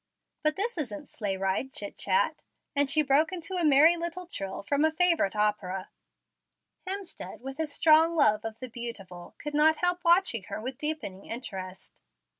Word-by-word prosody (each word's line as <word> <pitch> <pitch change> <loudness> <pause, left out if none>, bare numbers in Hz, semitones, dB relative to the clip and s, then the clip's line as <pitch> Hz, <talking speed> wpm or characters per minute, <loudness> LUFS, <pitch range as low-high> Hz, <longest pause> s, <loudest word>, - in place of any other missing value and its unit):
But 305 0 +1
this 420 -2 -2
isn't 265 0 -5
sleigh 200 -3 -3
riding 195 +7 -1
chit 205 -6 -4
chat," 475 - +1 0.3
and 285 -1 +2
she 305 +1 +5
broke 290 +4 +3
into 365 +1 -4
a 360 -2 -1
merry 305 +3 +6
little 340 +2 -4
trill 195 - -4
from 285 +7 +1
a 315 - +5
favorite 335 - +2
opera. 205 -3 -1 1.0
Hemstead, 390 -8 -5
with 270 +1 -7
his 315 -2 -2
strong 320 +2 +5
love 215 -9 +3
of 225 -1 -6
the 255 - -7
beautiful, 220 -7 -8
could 295 0 -6
not 310 +1 +4
help 355 0 +1
watching 340 - +3
her - - -6
with 255 +4 -6
deepening 300 -11 -4
interest. 190 -6 -7
285 Hz, 170 wpm, -28 LUFS, 210-330 Hz, 1.0 s, merry